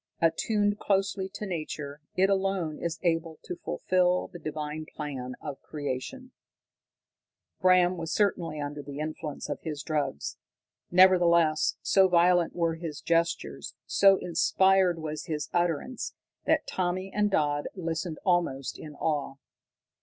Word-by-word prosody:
Attuned 205 +5 +1
closely 195 -1 0
to 210 - -4
nature, 155 -5 -5
it 190 +1 +4
alone 195 -5 0
is 170 -1 -2
able 165 -2 0
to 180 - -5
fulfil 180 0 +1
the 175 - -8
divine 155 0 -5
plan 130 -4 -5
of 145 -3 -7
Creation." 150 - -5 1.3
Bram 185 0 +4
was 165 0 -4
certainly 170 -7 0
under 145 0 -4
the 140 0 -8
influence 155 0 -5
of - - -4
his 150 -3 -5
drug; 150 - -1 0.7
nevertheless, 170 -4 +5
so 190 -1 +5
violent 175 -1 +3
were 170 -2 +1
his 165 -2 -6
gestures, 170 0 -1
so 195 -1 +5
inspired 190 +1 +3
was 155 -1 -5
his 150 -2 -3
utterance, 175 - -1 0.3
that - - +2
Tommy 185 +1 -2
and 210 0 +2
Dodd 145 -5 +1
listened 165 -2 -3
almost 170 -8 0
in 150 -2 -9
awe. 145 -3 -1
170 Hz, 130 wpm, -28 LUFS, 155-185 Hz, 1.3 s, nevertheless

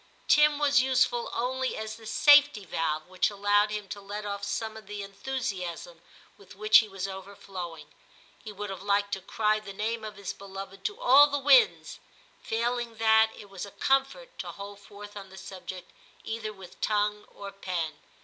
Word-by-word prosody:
Tim 300 0 +5
was 285 -3 +4
useful 255 -2 +1
only 260 +2 -2
as 220 0 -5
the 225 -1 -12
safety 290 -3 +5
valve 155 -2 -2
which 185 0 0
allowed 205 +1 +2
him 210 -1 -4
to 205 0 -6
let 205 +1 -6
off 200 0 -4
some 220 +2 -3
of 220 -3 -11
the 205 -1 -5
enthusiasm 195 -6 -5 0.4
with 200 - -15
which 215 +2 +6
he 220 - -2
was 195 0 -4
overflowing. 190 -3 -8 0.6
He 215 - -7
would 205 0 -6
have 190 - -7
liked 200 0 +1
to 195 - -2
cry 215 +2 +1
the 205 -2 -9
name 220 +3 -2
of 215 -1 -7
his 200 -2 -5
beloved 195 0 -9
to 420 +2 -2
all 290 - +7
the 285 0 -1
winds; 435 - +4 0.4
failing 235 +1 -2
that, 220 0 +5
it 205 -2 -12
was 195 -2 -6
a 200 - -6
comfort 270 - -1
to - - -5
hold 200 0 -9
forth 205 0 -12
on 195 -2 -9
the 190 - -13
subject 185 -1 -9 0.3
either 220 -1 -4
with 190 -4 -14
tongue 210 0 0
or 200 0 -9
pen. 175 -6 -4
205 Hz, 180 wpm, -28 LUFS, 195-230 Hz, 0.6 s, all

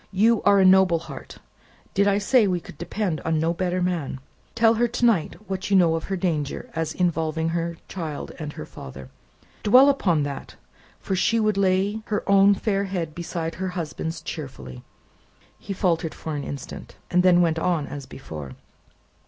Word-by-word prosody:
"You 215 +3 +3
are 200 -1 +6
a 190 - +5
noble 185 -2 +6
heart. 165 - -10 0.6
Did 200 +1 +3
I 200 0 +3
say 215 +2 +3
we 180 -2 0
could 155 - -13
depend 175 -1 -2
upon 160 -1 0
no 165 +2 +1
better 180 +1 -1
man? 165 -7 -2 0.4
Tell 230 -1 +5
her, 240 +1 +2
to 240 +1 -1
night, 205 -10 +2
what 190 0 -3
you 200 - +3
know 170 -3 +4
of 165 - -2
her 195 - -2
danger 160 -6 -2
as 160 -1 -2
involving 165 -2 0
her 170 0 -2
child 160 -6 -5
and 150 -2 -5
her - - -7
father. 65 -2 -10 0.5
Dwell 255 +7 +7
upon 175 - +2
that, 140 -1 -6 0.4
for 190 - -2
she 220 +5 +2
would 215 -2 +2
lay 195 +2 +1
her 210 - -2
own 200 0 +6
fair 200 0 0
head 175 -5 -3
beside 165 -1 -4
her 190 - 0
husband's 160 0 -4
cheerfully." 130 - -7 0.8
He 205 - -8
faltered 170 -4 0
for 160 -2 -5
an 145 - -3
instant; 140 0 -8
then 180 0 +5
went 165 -2 +2
on 165 -3 0
as 140 -2 -8
before. 75 - -8
175 Hz, 175 wpm, -24 LUFS, 160-195 Hz, 0.8 s, Dwell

